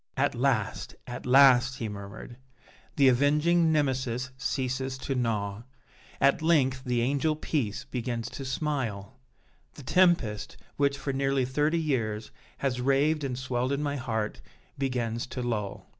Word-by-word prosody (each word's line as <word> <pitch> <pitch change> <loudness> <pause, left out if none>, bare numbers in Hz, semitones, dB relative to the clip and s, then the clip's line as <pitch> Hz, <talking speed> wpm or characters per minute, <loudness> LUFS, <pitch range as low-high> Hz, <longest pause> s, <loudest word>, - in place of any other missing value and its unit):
"At 140 +2 +2
last, 125 -4 -1
at 120 +1 -7
last," 130 0 +6
he 120 -5 -4
murmured, 105 +3 -8 0.6
"the 140 -2 +5
avenging 150 +6 +3
Nemesis 130 -4 0
ceases 130 0 -2
to 135 +1 -3
gnaw! 110 -5 -1 0.6
At 140 +3 +3
length 135 -6 +2
the 125 -2 0
angel 140 +5 +1
Peace 140 -9 -2
begins 120 -3 -3
to 135 - -6
smile! 130 -6 -3 0.6
The 145 - -11
tempest, 140 - +2 0.2
which, 140 -1 +1
for 135 0 -3
nearly 135 -1 +1
thirty 150 +5 +1
years, 115 -8 -2 0.3
has 125 -3 -1
raved 145 +4 +2
and 130 -3 -2
swelled 130 0 -1
in 140 +1 -1
my 145 -1 -1
heart, 110 -4 -3 0.3
begins 120 -4 -2
to 125 -1 -5
lull! 105 -5 -3
130 Hz, 140 wpm, -28 LUFS, 120-140 Hz, 0.6 s, last